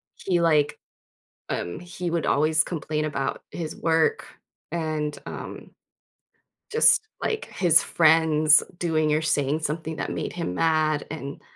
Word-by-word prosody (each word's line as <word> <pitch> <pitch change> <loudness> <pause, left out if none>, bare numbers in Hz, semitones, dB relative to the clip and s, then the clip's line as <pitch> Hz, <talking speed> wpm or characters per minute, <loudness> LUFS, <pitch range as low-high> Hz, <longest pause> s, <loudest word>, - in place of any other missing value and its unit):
he, 180 -3 -1
like, 150 -3 +2 0.7
um 85 - -3
he 175 0 -5
would 170 -2 -1
always 155 +2 +3
complain 155 -2 -3
about 140 -3 -3
his 160 -3 -5
work 160 -1 +1 0.5
and, 155 -3 -2
um, - - -8 1.0
just 445 0 +4
like 440 0 -2
his 175 -4 +3
friends 155 -2 +4 0.2
doing 155 -3 +1
or 155 - +1
saying 150 -1 +1
something 160 +1 -3
that - - -3
made - - -4
him 90 - -3
mad 155 - +1
and 140 -3 -7
155 Hz, 130 wpm, -25 LUFS, 150-165 Hz, 1.0 s, just